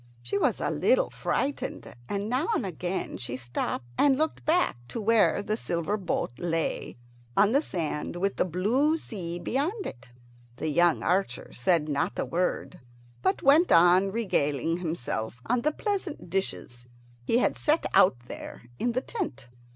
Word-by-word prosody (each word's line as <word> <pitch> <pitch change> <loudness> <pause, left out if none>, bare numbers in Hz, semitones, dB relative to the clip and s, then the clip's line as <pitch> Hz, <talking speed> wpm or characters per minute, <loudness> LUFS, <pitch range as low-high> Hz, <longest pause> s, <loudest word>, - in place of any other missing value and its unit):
She 125 +12 -1
was - - +1
a - - 0
little - - +2
frightened, 280 +1 -2 0.2
and 200 0 -2
now 255 +8 0
and 240 - -1
again 180 +1 -3
she 125 0 -4
stopped 120 -1 -3
and 275 -2 +5
looked 315 +1 -1
back 340 - +2
to 230 - -5
where 220 -2 +3
the 215 - -1
silver 170 -2 -1
boat 185 - -2
lay 165 -6 -2 0.4
on 205 +1 +5
the 280 +4 +4
sand 165 - -3
with 195 +3 -1
the - - +3
blue 230 - +2
sea 175 - -6
beyond 310 - -1
it. 120 +1 -8 0.5
The 155 - -3
young 170 +2 +3
archer 180 -7 -1
said 150 +4 +2
not 145 -2 -1
a - - 0
word, 180 +5 -2 0.4
but 190 - +1
went 300 +6 +5
on 180 +3 +6
regaling 165 - 0
himself 125 -9 -3
on 245 0 +1
the 305 - +2
pleasant 370 - -3
dishes 125 -10 -3 0.4
he 230 - +2
had - - +2
set 310 +2 +1
out 180 -9 +6
there - - -9 0.2
in 240 - 0
the 255 - 0
tent. 345 - -5
190 Hz, 160 wpm, -28 LUFS, 165-255 Hz, 0.5 s, on